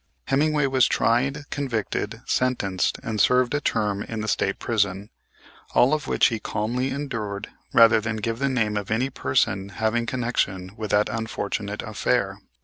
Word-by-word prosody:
Hemmingway 150 +1 +2
was 130 -2 +3
tried, 135 +5 +1
convicted, 130 -7 -3
sentenced 105 -8 0
and 110 -2 -1
served 125 0 +3
a 145 - 0
term 105 -6 0
in 110 +1 -4
the 110 - -4
State 100 -1 0
Prison; 100 -3 -1 0.6
all 130 +5 +5
of 155 -1 -1
which - - +4
he 115 -2 -3
calmly 120 +6 -2
endured 110 -8 -4 0.2
rather 115 -1 +6
than 110 0 -2
give 115 +2 -3
the 140 0 +1
name 110 -5 0
of 100 -2 -4
any 125 +5 0
person 100 -7 0
having 110 +3 -1
connection 105 -7 -1
with 110 -2 -5
that 105 +1 +3
unfortunate 105 -2 -3
affair. - - -1
115 Hz, 155 wpm, -24 LUFS, 105-130 Hz, 0.6 s, rather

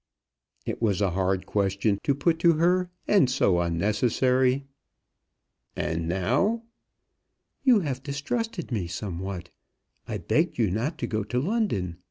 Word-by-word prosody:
It - - -4
was 100 -5 +1
a 100 -3 +1
hard 95 +1 0
question 100 0 0
to 140 - +2
put 160 +3 +1
to 170 0 +5
her, 180 +3 +2 0.2
and 195 -11 +4
so 100 -9 +2
unnecessary! 125 +9 +2 1.1
"And 80 0 -2
now?" 145 - +1 1.0
"You 250 -6 +5
have 135 -6 -3
distrusted 165 - -3
me 100 -7 -1
somewhat. 90 0 -5 0.6
I 110 - -3
begged 160 - 0
you 110 -6 +2
not 125 - -1
to 120 - -2
go 110 -2 -2
to 125 +4 -1
London. 130 - -1
120 Hz, 135 wpm, -26 LUFS, 95-160 Hz, 1.1 s, to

